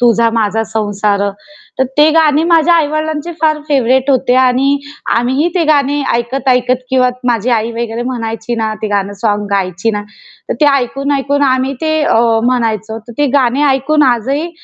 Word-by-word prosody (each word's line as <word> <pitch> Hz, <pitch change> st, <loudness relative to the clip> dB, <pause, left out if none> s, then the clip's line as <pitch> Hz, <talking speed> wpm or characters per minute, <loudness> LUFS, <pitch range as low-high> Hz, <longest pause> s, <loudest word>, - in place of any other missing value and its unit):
तुझा 235 Hz, -1 st, +3 dB
माझा 225 Hz, -1 st, 0 dB
संसार. 205 Hz, -2 st, -1 dB, 0.6 s
तर 260 Hz, -, +3 dB
ते 300 Hz, +1 st, +6 dB
गाणे 310 Hz, -1 st, +3 dB
माझ्या 335 Hz, 0 st, +3 dB
आई-वडिलांचे 310 Hz, +1 st, -1 dB
फार 310 Hz, -1 st, +2 dB
फेव्हराइट 265 Hz, -1 st, +2 dB
होते 255 Hz, -1 st, +2 dB
आणि 260 Hz, +2 st, +2 dB, 0.4 s
आम्हीही 260 Hz, +7 st, +1 dB
ते 345 Hz, -3 st, +1 dB
गाणे 290 Hz, -1 st, +2 dB
ऐकत, 240 Hz, +3 st, -2 dB
ऐकत 250 Hz, 0 st, +1 dB
किंवा 255 Hz, -1 st, +3 dB, 0.2 s
माझी 235 Hz, 0 st, 0 dB
आई 230 Hz, -1 st, 0 dB
वगैरे 230 Hz, 0 st, -4 dB
म्हणायची 230 Hz, -2 st, -4 dB
ना, 220 Hz, -1 st, -1 dB
ते 215 Hz, -, -1 dB
गाणं 200 Hz, -1 st, -1 dB
सोंग 205 Hz, -2 st, 0 dB
गायची 195 Hz, +2 st, -1 dB
ना, 205 Hz, -1 st, -3 dB, 0.5 s
तर -, -, -1 dB
ते 300 Hz, -, +5 dB
ऐकून, 275 Hz, +2 st, -2 dB
ऐकून 285 Hz, +1 st, 0 dB
आम्ही 260 Hz, 0 st, +1 dB
ते 315 Hz, 0 st, 0 dB
अ, 295 Hz, -, +2 dB, 0.3 s
म्हणायचो. 225 Hz, -3 st, -1 dB
तर -, -, -8 dB
ते 290 Hz, -, +2 dB
गाणे 265 Hz, 0 st, +2 dB
ऐकून 275 Hz, +3 st, +1 dB
आजही 270 Hz, +7 st, -1 dB
255 Hz, 170 wpm, -13 LUFS, 225-285 Hz, 0.6 s, ते